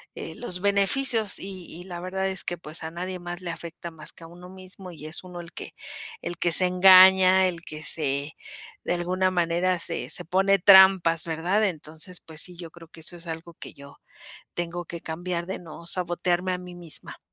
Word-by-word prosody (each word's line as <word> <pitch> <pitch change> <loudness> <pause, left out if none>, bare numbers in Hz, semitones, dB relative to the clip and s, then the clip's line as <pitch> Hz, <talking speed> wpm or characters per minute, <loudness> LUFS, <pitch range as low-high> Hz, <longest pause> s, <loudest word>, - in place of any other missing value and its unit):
eh, - - -7
los 180 -7 -4
beneficios. 205 +3 +2
Y 190 -2 -7
y 175 +2 -9
la 175 -2 -7
verdad 190 +2 -2
es 190 -1 -1
que, 175 - -2
pues, 155 0 -9
a 160 - -5
nadie 180 +2 -5
más 175 +1 -7
le 175 -2 -4
afecta, 170 +1 -8
más 155 0 -8
que 165 - -15
a - - -9
uno 175 +2 -13
mismo, 185 0 -9
y 155 -2 -10
es 155 +4 -5
uno 180 -1 -9
el 170 0 -9
que - - -7 0.5
el 175 - -5
que 170 - +1
se 185 - +5
engaña. 185 0 +7
El 170 -2 -4
que 155 0 -7
se 145 -1 -2 0.5
de - - 0
alguna 185 +2 0
manera, 175 +1 +1
se - - -3
se 180 - -4
pone 195 +3 +3
trampas, 190 -3 +7
¿verdad? 175 +6 +1
Entonces, 160 +1 -5
pues 160 -1 -5
sí, 180 -1 -3
yo 170 -2 -9
creo 170 -1 -14
que 160 - -13
eso 175 +2 -1
es 170 0 -12
algo, 165 +1 -7
que - - -9
yo 140 0 -14 0.6
tengo 175 0 -4
que 170 +1 -7
cambiar. 170 +1 -4
De 190 - -4
no 170 0 -12
sabotearme, 180 +1 -1
a 180 - -2
mí 180 -1 -10
misma. 170 -3 +2
175 Hz, 210 wpm, -25 LUFS, 165-185 Hz, 0.6 s, engaña